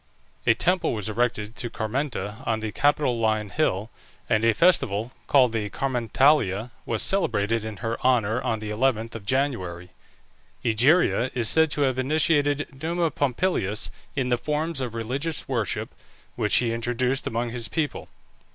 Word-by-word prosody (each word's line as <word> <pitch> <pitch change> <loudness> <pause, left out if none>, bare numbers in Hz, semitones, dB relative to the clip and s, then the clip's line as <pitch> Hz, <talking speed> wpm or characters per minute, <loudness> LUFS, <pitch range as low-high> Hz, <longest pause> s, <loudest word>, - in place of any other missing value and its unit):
A 115 - +6
temple 180 +5 +1
was 110 -2 -4
erected 110 -1 -1
to 120 +3 -3
Carmenta 110 -3 -3
on 110 -1 +1
the 110 -1 -4
Capitoline 115 -7 +1
Hill, 110 -8 0 0.4
and 110 - +2
a 115 - +5
festival, 115 - +2 0.2
called 130 -4 +5
the 110 -2 -2
Carmentalia, 120 -1 +1 0.2
was 115 - -1
celebrated 115 - +1
in 110 -2 -6
her 115 +1 -2
honour 125 -2 +2
on 115 - -1
the 105 -1 -6
11th 115 0 0
of 105 -3 -8
January. 95 -11 -1 0.7
Egeria 125 +3 +3
is 120 -3 +1
said 160 +3 +4
to 145 - -1
have 130 -2 +1
initiated 145 0 +1
Numa 165 0 0
Pompilius 125 - -1 0.2
in 130 -3 0
the 120 -1 +1
forms 150 +2 -1
of 120 -3 -4
religious 135 +8 -3
worship, 115 -8 -2 0.4
which - - +1
he 115 -2 +2
introduced 120 +3 -1
among 115 +1 -2
his 120 -1 -4
people. 150 -5 -3
120 Hz, 150 wpm, -25 LUFS, 110-145 Hz, 0.7 s, A